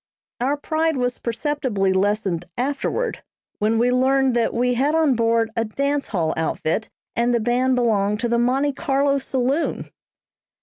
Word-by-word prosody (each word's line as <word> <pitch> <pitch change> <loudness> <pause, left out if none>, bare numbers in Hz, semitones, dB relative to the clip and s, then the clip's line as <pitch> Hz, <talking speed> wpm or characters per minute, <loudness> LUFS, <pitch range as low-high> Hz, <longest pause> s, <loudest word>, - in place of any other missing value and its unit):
Our 270 +4 0
pride 315 +1 0
was 245 -1 -1
perceptibly 235 -6 -1
lessened 190 -3 0
afterward, 290 - -2 0.4
when 215 +2 +1
we 240 +2 +3
learned 260 0 +2
that 235 -1 +1
we 245 +1 +1
had 280 +6 +1
on 315 -4 +3
board 230 -1 +1
a 230 - +1
dance 280 +6 -1
hall 165 -6 -1
outfit, 160 +5 -2 0.3
and 240 +1 +2
the - - +2
band 250 +3 +1
belonged 210 -4 +1
to 240 - 0
the 235 0 +1
Monte 270 +4 +1
Carlo 280 -1 +1
saloon! 265 +3 -1
245 Hz, 150 wpm, -22 LUFS, 225-275 Hz, 0.4 s, we